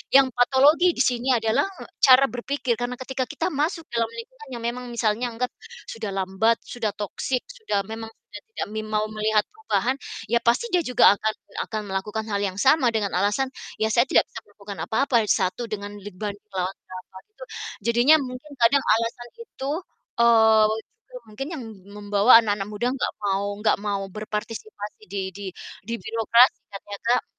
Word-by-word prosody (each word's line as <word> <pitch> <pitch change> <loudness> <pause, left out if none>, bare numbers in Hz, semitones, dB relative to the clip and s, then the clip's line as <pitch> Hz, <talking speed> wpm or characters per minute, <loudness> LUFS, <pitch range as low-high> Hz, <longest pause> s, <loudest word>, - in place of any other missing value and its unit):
yang 275 -1 +8
patologi 285 +8 +4
disini 250 0 +1
adalah 225 +5 +2 0.2
e - - -5 0.2
cara 260 +1 +8
berpikir. 250 0 -1
Karena 245 +1 -2
ketika 260 0 -2
kita 315 +3 -2
masuk 315 +4 -1
dalam 230 -1 +1
lingkungan 260 +5 -10
yang 230 - -7
memang 250 +1 -4
misalnya 235 0 0
anggap 250 +2 -3 0.4
sudah 225 -2 -5
lambat, 190 +5 +2
sudah 225 -4 -3
toxic 230 +5 -2 0.2
sudah 205 - -1
memang 225 0 -6
sudah - - -13
tidak - - -4
mim 215 0 -3
mau 215 0 +1
melihat 215 0 +1
perubahan, 430 - -1 0.4
ya 235 - +4
pasti 240 - +2
dia 350 - +3
juga 250 - +3
akan 220 +1 -1 0.3
akan 215 -1 -3
melakukan 210 +3 -3
hal 200 - 0
yang 190 -1 -2
sama 270 +1 +4
dengan 205 -2 0
alasan, 205 +7 +1 0.3
ya 220 - +3
saya 240 - +5
tidak - - +5
bisa - - -8
melakukan 205 -1 -10
apa-apa, 255 +2 0
1 190 +6 +1
dengan 205 -1 -4
leban 205 0 -6 0.2
melawan 185 0 -2
berapa 185 +1 -11 0.2
gitu. 470 - -12 0.4
Jadinya 240 +7 +6
mungkin 260 +2 -7
kadang 270 +4 +5
alasan 230 +2 0
itu, 280 -11 -6 0.5
eee, 220 -2 +6 0.4
itu - - -25
mungkin 215 +6 -6
yang 260 - -6 0.3
membawa 205 +2 +2
anak-anak 205 -2 -1
muda 210 +3 -2
enggak 270 - -2
mau 200 0 0 0.2
enggak 215 - +3
mau 200 -1 -1
berpartisipasi 215 - -6
di 200 +1 -4 0.2
di 200 - -7 0.4
di 230 - -3
birokrasi 230 +2 +4
ya, - - -10
ternyata 205 +3 -3
m - - -42
230 Hz, 170 wpm, -24 LUFS, 205-255 Hz, 0.5 s, yang